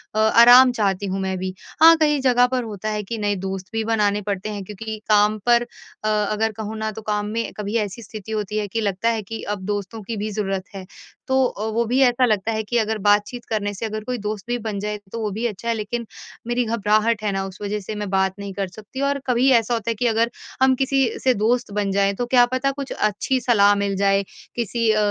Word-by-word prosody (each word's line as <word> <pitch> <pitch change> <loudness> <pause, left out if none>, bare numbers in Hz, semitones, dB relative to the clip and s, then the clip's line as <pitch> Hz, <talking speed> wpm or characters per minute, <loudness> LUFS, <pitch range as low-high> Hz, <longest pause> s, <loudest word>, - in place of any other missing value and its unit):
अ, - - +1
आराम 245 +4 +7
चाहती 205 -4 0
हूँ 195 0 -2
मैं 190 -1 -2
भी। 185 0 -4 0.3
हाँ, 330 +1 +9
कई 295 -2 +2
जगह 250 -1 +4
पर 255 -1 -1
होता 215 -1 -5
है 210 -1 -2
कि 225 +3 -5
नए 205 -1 0
दोस्त 190 0 -5
भी 225 - 0
बनाने 210 -2 +1
पड़ते 200 0 -3
हैं 205 -2 -5
क्योंकि 215 +3 -6
काम 210 0 +4
पर 240 0 +5 0.4
अ, - - -1
अगर 215 +1 0
कहूँ 215 0 -6
ना 220 0 -2
तो 220 - -8
काम 210 -1 -1
में 230 +1 -2
कभी 210 +1 -4
ऐसी 210 +1 -3
स्थिति 215 +1 -9
होती 210 -1 -2
है 210 -1 -1
कि 225 +3 -2
लगता 200 +2 0
है 225 -1 0
कि 225 +3 -7
अब 190 - -11
दोस्तों 205 +2 -4
की 225 +2 -5
भी 210 +1 -3
ज़रूरत 195 -2 -2
है। 190 -1 -7 0.4
तो 265 0 +3
अ, 215 -3 -3
वो 235 +1 +1
भी 250 +4 +1
ऐसा 250 0 +4
लगता 215 -1 0
है 220 0 -1
कि 240 +3 -1
अगर 220 -1 0
बातचीत 210 +4 +2
करने 205 -2 -1
से 210 +4 -5
अगर 215 0 -4
कोई 250 +2 -3
दोस्त 210 -2 -5
भी 245 - -1
बन 215 -3 -4
जाए 210 +1 -3
तो 230 - -5
वो 215 - -1
भी 220 +4 -3
अच्छा 220 +2 -7
है 230 - +2
लेकिन 225 +2 -4 0.4
मेरी 240 +1 +1
घबराहट 215 0 +1
है 205 - 0
ना 195 0 -2
उस 190 -1 -9
वज़ह 205 +1 -2
से 210 +2 -6
मैं 210 -1 -4
बात 190 0 +1
नहीं 200 -1 -6
कर 195 0 -2
सकती 215 +7 -9
और 280 0 +1
कभी 250 +2 +3
ऐसा 235 0 +2
होता 230 -1 -2
है - - -3
कि 245 +3 0
अगर 230 +1 +2 0.3
हम 265 0 +5
किसी 270 +1 +1 0.2
से 260 - +4
दोस्त 235 +1 0
बन 205 -2 -1
जाएँ 200 0 +2
तो 245 - -2
क्या 245 0 +5
पता 265 +2 +1
कुछ 275 0 -7
अच्छी 215 +5 0
सलाह 205 -4 +4
मिल 200 -1 -1
जाए 195 0 +2 0.3
किसी 230 0 0
अ, 215 - +1
215 Hz, 245 wpm, -22 LUFS, 205-235 Hz, 0.4 s, हाँ